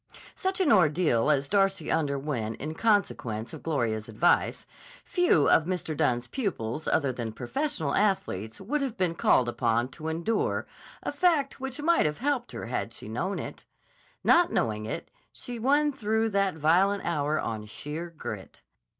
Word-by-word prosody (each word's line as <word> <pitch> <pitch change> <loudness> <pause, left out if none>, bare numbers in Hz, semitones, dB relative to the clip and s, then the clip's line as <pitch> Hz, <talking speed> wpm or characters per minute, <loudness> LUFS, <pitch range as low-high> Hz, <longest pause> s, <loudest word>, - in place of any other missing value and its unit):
Such 380 +1 -2
an 365 -6 +3
ordeal 155 - +3
as 140 -2 +2
Darcy 195 -3 +1
underwent 140 -7 -1
in 155 +5 -4
consequence 160 - 0
of - - -8
Gloria's 115 -8 -1
advice, 135 +11 +2 0.4
few 355 - +3
of 160 - +5
Mr. 175 -3 -3
Dunne's 125 -5 +1
pupils 160 - -3
other 140 -4 +1
than 120 -2 -4
professional 160 - -2
athletes 110 - 0
would 280 +10 -2
have 260 -4 -3
been 180 -3 +1
called 130 -6 +3
upon 120 0 +1
to 155 +3 -8
endure, 170 +8 -1 0.4
a - - -2
fact 310 -8 +1
which 270 +2 -5
might 335 - +4
have 150 - -3
helped 265 -1 -1
her - - -6
had 115 -1 -3
she - - -9
known 170 - -2
it. - - -7 0.6
Not 345 0 +5
knowing 110 -1 -1
it, - - -5 0.2
she 245 -1 -7
won 290 +5 +3
through 220 -3 0
that 195 -3 +1
violent 180 +6 +3
hour 155 -2 0
on 110 -2 -3
sheer 150 +10 -6
grit. 165 - -8
160 Hz, 160 wpm, -28 LUFS, -, 0.6 s, of